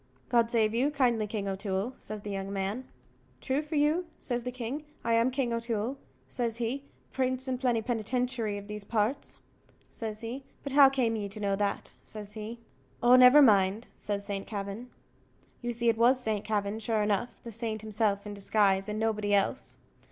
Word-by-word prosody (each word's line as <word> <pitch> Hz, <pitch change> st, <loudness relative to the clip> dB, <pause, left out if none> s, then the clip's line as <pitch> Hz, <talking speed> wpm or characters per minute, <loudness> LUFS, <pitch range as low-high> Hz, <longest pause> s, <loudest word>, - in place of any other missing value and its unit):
"God 235 Hz, -2 st, +3 dB
save 220 Hz, -2 st, +2 dB
you 255 Hz, +5 st, +2 dB
kindly, 245 Hz, -7 st, +1 dB
King 205 Hz, -1 st, -3 dB
O'Toole," 195 Hz, +4 st, -2 dB
says 215 Hz, -1 st, -7 dB
the 205 Hz, -, -5 dB
young 195 Hz, 0 st, -4 dB
man. 200 Hz, +6 st, -3 dB, 0.5 s
"True 270 Hz, +2 st, 0 dB
for 305 Hz, +1 st, -5 dB
you," 305 Hz, +4 st, +2 dB
says 245 Hz, -2 st, -2 dB
the 250 Hz, +1 st, -4 dB
king. 255 Hz, +4 st, -4 dB, 0.2 s
"I 230 Hz, -, +1 dB
am 230 Hz, +2 st, +4 dB
King 255 Hz, -2 st, -1 dB
O'Toole," 230 Hz, +1 st, -2 dB, 0.3 s
says 230 Hz, -, -2 dB
he, 245 Hz, +4 st, -2 dB, 0.3 s
"prince 260 Hz, 0 st, 0 dB
and 255 Hz, -1 st, -2 dB
plennypennytinchery 240 Hz, -1 st, 0 dB
of 200 Hz, 0 st, -8 dB
these 210 Hz, -1 st, -6 dB
parts," 220 Hz, +4 st, -1 dB, 0.5 s
says 215 Hz, -1 st, -5 dB
he; 240 Hz, +4 st, -5 dB, 0.2 s
"but 280 Hz, -, -3 dB
how 280 Hz, -1 st, +8 dB
came 250 Hz, -4 st, +1 dB
ye 205 Hz, -2 st, -3 dB
to 210 Hz, +2 st, -8 dB
know 200 Hz, -1 st, +1 dB
that?" 200 Hz, 0 st, -2 dB
says 210 Hz, -1 st, -8 dB
he. 220 Hz, +2 st, -6 dB, 0.5 s
"Oh, 245 Hz, +1 st, +8 dB
never 255 Hz, +3 st, +9 dB
mind," 205 Hz, -1 st, +4 dB
says 200 Hz, -1 st, -4 dB
St. 200 Hz, -1 st, -4 dB
Kavin. 205 Hz, +3 st, -5 dB, 0.7 s
You 240 Hz, -1 st, -2 dB
see 235 Hz, 0 st, -1 dB
it 225 Hz, -1 st, +3 dB
was 250 Hz, +2 st, +5 dB
Saint 220 Hz, -4 st, -1 dB
Kavin, 210 Hz, 0 st, -1 dB
sure 220 Hz, -1 st, 0 dB
enough 210 Hz, +3 st, -1 dB
the 235 Hz, -, -7 dB
saint 220 Hz, -1 st, -4 dB
himself 210 Hz, -2 st, 0 dB
in 205 Hz, -, -5 dB
disguise, 195 Hz, -1 st, +2 dB
and 210 Hz, -, -2 dB
nobody 215 Hz, -2 st, +1 dB
else. 200 Hz, +6 st, -1 dB
225 Hz, 180 wpm, -29 LUFS, 205-250 Hz, 0.7 s, never